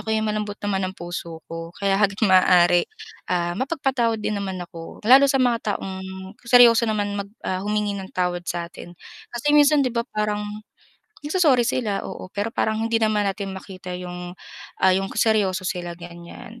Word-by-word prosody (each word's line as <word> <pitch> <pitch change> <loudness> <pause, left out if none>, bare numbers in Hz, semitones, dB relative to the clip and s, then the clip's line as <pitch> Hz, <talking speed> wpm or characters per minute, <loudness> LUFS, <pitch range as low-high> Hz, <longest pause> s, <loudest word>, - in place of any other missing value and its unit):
ako, 210 - -10
eh, 220 - 0
malambot 210 -1 -2
naman 195 -2 0
ang 190 - -9
puso 170 -1 -7
ko, 165 +1 -7
kaya 195 0 +1
hangga't 200 +1 +2
maaari, 180 -2 +5 0.4
ah, 175 -1 0
mapagpatawad 260 - 0
din 215 - -3
naman 190 -2 -4
ako. 165 +3 -11
Lalo 270 +5 +7
sa 270 - +2
mga 235 -5 +1
taong 190 -1 -6 0.5
seryoso 235 -2 +7
naman 205 -1 -1
mag, 200 - -7 0.2
ah, 185 0 -1
humingi 210 0 -1
ng 195 -1 -6
tawad 180 -1 -1
satin. 175 0 -6 0.3
Kasi 280 +5 -1
minsan 295 -1 +5
'di 250 - -1
ba 235 0 -2
parang 210 0 -1 0.8
nagso-sorry 295 -7 +3
sila- 220 -4 -1
oo- - - -7
pero 210 +3 -2
parang 220 0 0
hindi 230 0 +1
naman 215 -2 +2
natin 195 -1 -3
makita 185 -2 -8
yung, 180 0 -7 0.5
ah, 190 - +6
yung 195 +1 0
ka - - -10
seryoso 200 -4 +2
sila 175 -1 -4
ganyan. 175 +6 -11
200 Hz, 175 wpm, -23 LUFS, 180-230 Hz, 0.8 s, Lalo